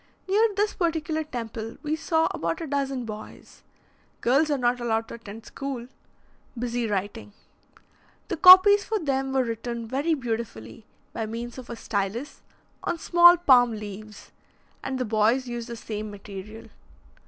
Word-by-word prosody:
Near 420 +4 +4
this 415 +1 +1
particular 320 -2 -1
temple, 230 -5 -6
we 305 +1 -1
saw 320 0 +1
about 165 0 -3
a 330 - -4
dozen 275 -3 -2
boys 215 -1 -10 0.6
girls 275 +6 +3
are 290 - +1
not 245 -1 +1
allowed 225 -1 -1
to - - -8
attend 225 -1 -10
school 270 -2 -6 0.7
busy 240 0 -2
writing. 205 0 -4 0.9
The 360 - -2
copies 375 +4 +9
for 440 - -1
them 270 -6 -1
were 265 -1 +2
written 235 0 -4
very 285 +7 0
beautifully, 225 - -6 0.3
by 225 -1 -3
means 235 +3 -6
of 250 - -11
a 235 - -5
stylus, 220 +6 -4 0.4
on 345 - -2
small 345 +1 +6
palm 250 -8 +5
leaves, 210 0 -9 0.5
and 270 -1 -3
the 255 - -2
boys 220 +4 +2
used 240 0 -5
the 235 - -5
same 215 -1 -6
material. 205 +2 -10
240 Hz, 150 wpm, -25 LUFS, 220-295 Hz, 0.9 s, copies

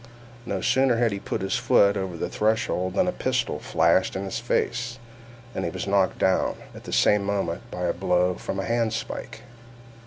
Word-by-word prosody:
No 100 -3 -2
sooner 130 -2 +3
had 115 -1 +2
he 100 - -3
put - - -4
his 95 +7 0
foot 120 -5 +4
over 95 -3 -3
the - - -2
threshold 105 -4 0
than 185 - +2
a - - +2
pistol 125 - -1
flashed 85 +5 +2
in 95 - -2
his 95 - -3
face, 120 +1 -1 0.6
and - - -3
he - - -1
was 95 -1 -5
knocked 100 -1 +2
down, 95 - +2 0.2
at - - -12
the - - -7
same 105 -1 +4
moment, 100 -4 -2
by 90 - -5
a 85 - +1
blow 90 0 +1
from 95 - -5
a 95 - -2
handspike. 115 -1 -2
100 Hz, 190 wpm, -25 LUFS, 95-115 Hz, 0.6 s, foot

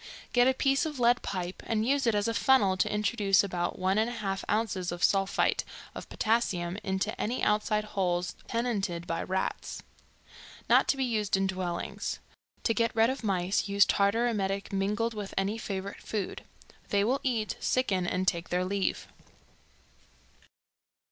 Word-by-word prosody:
Get 245 0 +5
a 260 - +3
piece 275 +4 +2
of 295 -4 -6
lead 240 0 +4
pipe 180 -1 -4
and 220 -1 0
use 275 -1 +2
it 225 - +3
as 205 +1 +1
a 230 - 0
funnel 225 -7 +4
to 185 - 0
introduce 210 -1 +2
about 180 -3 -2
1 190 +2 +1
1/2 215 -4 -1
ounces 200 -5 0
of 175 0 -5
sulphite 195 -1 +2 0.3
of - - -8
potassium 195 -5 0
into 190 +2 -1
any 240 +4 -2
outside 210 0 +2
holes 180 -3 -1
tenanted 205 -8 -1
by 165 -1 -2
rats. 190 0 -3 0.8
Not - - +5
to 275 - +2
be 265 - +1
used 215 -5 0
in 195 - +1
dwellings. 185 -2 -3 0.5
To 225 - +2
get 230 0 0
rid 225 +2 +4
of 265 -2 -6
mice 190 -1 0
use 200 0 +5
tartar 205 +4 +2
emetic 200 -3 -2
mingled 210 +4 0
with 205 -2 -6
any 200 +3 0
favorite 195 -2 -5
food; 205 -4 -4 0.4
they 200 -1 +2
will 255 +6 +1
eat, 230 -5 -1
sicken 195 -8 +1
and 185 +1 -1
take 170 -1 0
their 180 +1 0
leave. 195 +1 -1
205 Hz, 160 wpm, -29 LUFS, 190-230 Hz, 0.8 s, Get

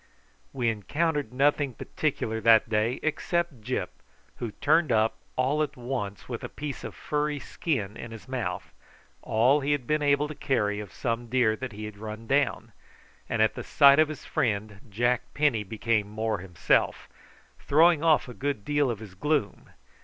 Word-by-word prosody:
We 125 -3 -1
encountered 145 - -1
nothing 140 0 +1
particular 110 -7 -2
that 115 -1 +6
day 110 +3 0
except 160 -3 -1
Gyp, 125 +4 -2 0.5
who 120 - -4
turned 155 0 +2
up 110 0 +2 0.2
all 135 +4 +1
at 150 -3 -2
once 120 -5 -4
with 120 -3 -5
a - - -5
piece 145 -2 -6
of - - -7
furry 150 0 -1
skin 120 - -3
in 115 - -8
his 115 -1 -11
mouth, 130 -2 -4 0.5
all 120 +6 +3
he 145 +1 +1
had 140 -4 -2
been 150 +4 +1
able 145 0 +2
to 155 - -6
carry 110 -8 0
of 105 -3 -8
some 120 0 -3
deer 115 -2 +2
that 130 +1 -6
he 105 +1 -6
had 105 -1 -9
run 110 +1 -7
down; 140 +1 0 0.6
and 110 - +2
at 110 - +2
the - - -6
sight 140 0 +6
of 155 -1 +4
his 155 - -8
friend 110 -7 -1
Jack 120 +4 +1
Penny 145 -8 +2
became 110 0 -1
more 110 -1 -2
himself, 90 -4 0 0.5
throwing 160 +2 +4
off 160 -4 +4
a 125 - -8
good 135 -5 -3
deal 145 -2 +2
of 115 - -2
his 105 -4 -10
gloom. 140 +1 -1
125 Hz, 175 wpm, -27 LUFS, 110-145 Hz, 0.6 s, that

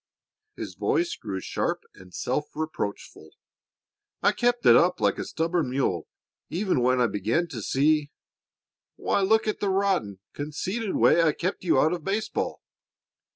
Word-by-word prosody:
His - - -6
voice 345 0 0
grew 95 -1 -5
sharp - - -2
and 95 -1 -15
self 150 +10 -3
reproachful. 155 -10 -5 0.9
"I - - +5
kept 240 0 0
it - - +8
up 180 +1 +4
like - - +1
a - - -1
stubborn 165 -3 -1
mule 125 - -1 0.4
even 180 -6 0
when 125 +1 +3
I 125 - +4
began 110 - 0
to 120 -8 -6
see 145 +5 +2 0.9
Why, - - 0
look 220 +3 +3
at 215 - -1
the 200 - 0
rotten, 190 - 0
conceited 185 +9 -3
way 170 - +5
I 160 -2 +3
kept 185 +4 -3
you 165 -7 +3
out 155 +5 +3
of 170 -3 -4
baseball. 210 +4 -2
160 Hz, 155 wpm, -26 LUFS, 130-195 Hz, 0.9 s, it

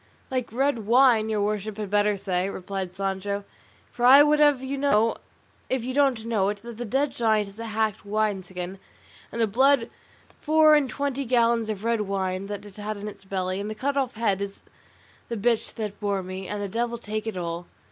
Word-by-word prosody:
"Like 255 -3 -2
red 245 -3 0
wine, 235 -2 +5
your 210 -2 0
worship 210 0 -2
had 210 -2 -5
better 205 0 +2
say," 185 -1 -1
replied 190 -1 -5
Sancho; 195 +1 -2 0.5
"for 240 - -5
I 270 +4 +9
would 300 0 +3
have 290 -3 +4
you 265 +1 -3
know, 230 -5 +2 0.5
if 260 -2 0
you 255 +2 -3
don't 265 -5 +2
know 210 -4 +1
it, 205 0 -5
that 235 -1 -9
the 240 - -4
dead 270 +6 0
giant 220 -3 +1
is 200 +2 -14
a 230 - -5
hacked 215 -1 -1
wine 210 -1 0
skin, 180 +1 -7 0.5
and 235 - -5
the 230 - +4
blood 255 +3 +3 0.5
four 310 0 +5
and 295 -3 +3
twenty 280 -1 -2
gallons 235 -2 +2
of 210 -1 -4
red 230 -1 +1
wine 190 -1 -2
that 205 0 -6
it 205 -1 -12
had 210 0 -4
in 205 +1 -6
its 200 -2 -10
belly, 185 -1 -2
and 205 +1 -4
the 215 - -5
cut 280 +6 -1
off 265 -4 -1
head 205 -4 0
is 200 0 -5 0.7
the 235 - -3
bitch 230 +2 0
that 210 -2 -5
bore 200 -2 -1
me; 185 +1 -6
and 205 0 -3
the - - -2
devil 235 +4 -2
take 215 -1 -4
it 215 -4 -3
all." 170 0 -4
215 Hz, 210 wpm, -25 LUFS, 200-240 Hz, 0.7 s, I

